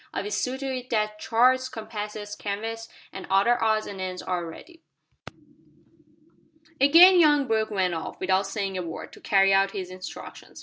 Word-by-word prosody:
I'll 205 +1 -3
see 250 +6 -2
to 275 - -6
it 255 0 -7
that 215 -1 -1
charts, 255 +4 +2
compasses, 210 -1 -7
canvas, 225 +3 -5 0.2
and 190 - -8
other 200 +6 +2
odds 220 -1 +1
and 195 -2 -7
ends 185 -1 -5
are 175 -2 -3
ready." 330 - -13 2.0
Again 340 +7 +7
young 295 -3 +4
Brooke 220 -2 0
went 190 -4 0
off, 165 - -6
without 190 +1 +1
saying 195 -2 -3
a - - -2
word, 165 -2 -8
to - - -15
carry 195 -1 +3
out 195 0 +2
his 185 -2 -6
instructions. 185 0 -10
210 Hz, 165 wpm, -25 LUFS, 195-240 Hz, 2.0 s, Again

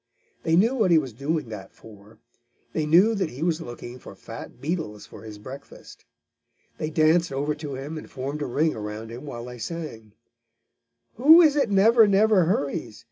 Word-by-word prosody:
They 160 - +1
knew 220 +8 +4
what 220 -8 +2
he 170 - +6
was 135 -6 -1
doing 140 +2 -2
that 105 -3 -9
for. 105 0 -16 0.6
They 155 -1 -1
knew 185 +9 +5
that 195 -6 -1
he 130 +6 -6
was 170 -1 0
looking 120 -2 -9
for - - -12
fat - - -10
beetles 150 - -4
for - - -13
his 110 -2 -10
breakfast. 130 +7 -12 0.7
They 155 - -2
danced 160 +1 +3
over 145 +3 -1
to 145 -2 -7
him 145 +4 -6
and - - -12
formed 140 +3 -5
a 145 - -2
ring 155 +6 +1
around 110 +1 -6
him 125 +6 -9
while 120 -3 -7
they 125 -1 -9
sang: 115 -9 -7 1.0
"Who 305 +8 +8
is 300 -3 +4
it 275 -6 +1
never, 220 +3 +5
never 200 -2 +4
hurries? 140 - -2
150 Hz, 185 wpm, -25 LUFS, 120-175 Hz, 1.0 s, Who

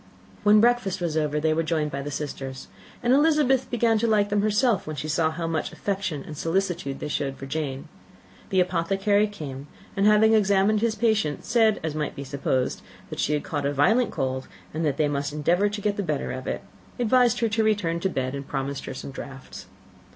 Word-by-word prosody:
When 210 +1 +6
breakfast 230 -5 +2
was 170 -3 -2
over, 150 -1 0
they 155 +1 +2
were 160 - +1
joined 155 -2 -1
by 140 - -3
the 145 - -5
sisters; 135 -2 -6 0.3
and 245 +1 +4
Elizabeth 290 -3 +3
began 230 -2 +2
to 230 - +1
like 210 -2 +3
them 205 0 +2
herself, 215 -1 +2
when 155 - -4
she 150 +2 -4
saw 160 +1 +2
how 165 +1 -4
much 165 -1 -2
affection 190 -7 -3
and 155 - -8
solicitude 165 -4 -1
they - - -4
showed 140 -2 -2
for 135 - -7
Jane. 135 -2 -4 0.6
The 190 -1 +3
apothecary 195 +4 +1
came; 145 -9 -8 0.3
and 200 0 +3
having 215 +1 +5
examined 205 0 +3
his 230 -1 +1
patient, 215 -11 0
said, 225 -3 +3
as 160 -2 -2
might 150 -1 -3
be 140 - -5
supposed, 135 -2 -1 0.3
that - - -6
she 150 - +1
had 150 - 0
caught 145 -4 -3
a 145 - -1
violent 215 - +3
cold, 130 0 -3 0.3
and 160 +2 -2
that 140 -2 -1
they 150 - +2
must 145 0 -2
endeavour 175 +7 +2
to 205 0 -5
get 205 0 0
the - - 0
better 155 -7 -2
of 130 0 -6
it; - - -3 0.3
advised 245 0 +3
her 230 - +2
to 220 +1 +1
return 200 -6 +1
to 190 - 0
bed, 130 -6 -2
and 140 0 -6
promised 140 0 -3
her 135 - -6
some 135 - -7
draughts. 135 -1 -9
170 Hz, 210 wpm, -25 LUFS, 145-210 Hz, 0.6 s, When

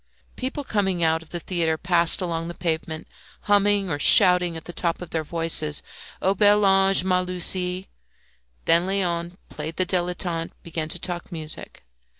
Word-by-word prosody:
People 265 +3 -4
coming 190 -8 -1
out 160 0 +2
of 165 - -16
the 175 - -5
theatre 165 -2 -1
passed 170 0 +2
along 165 -2 -3
the 170 - -7
pavement, 160 -1 -3 0.3
humming 205 -1 +2
or 145 -4 -3
shouting 180 +2 +6
at 160 - -10
the 175 - -8
top 170 -1 -2
of 180 -2 -9
their 160 -1 -1
voices, 155 -2 -2 0.4
"O 190 - +3
bel 205 +1 +4
ange, 195 -1 +4
ma 185 -1 +2
Lucie!" 180 +1 -2 0.8
Then 170 +2 +3
Léon, 175 -3 -2
playing 155 +1 -6
the 185 - +2
dilettante, 175 -2 -2
began 160 -2 -4
to 180 - -2
talk 175 +1 -6
music. 160 -2 -6
175 Hz, 160 wpm, -24 LUFS, 165-190 Hz, 0.8 s, shouting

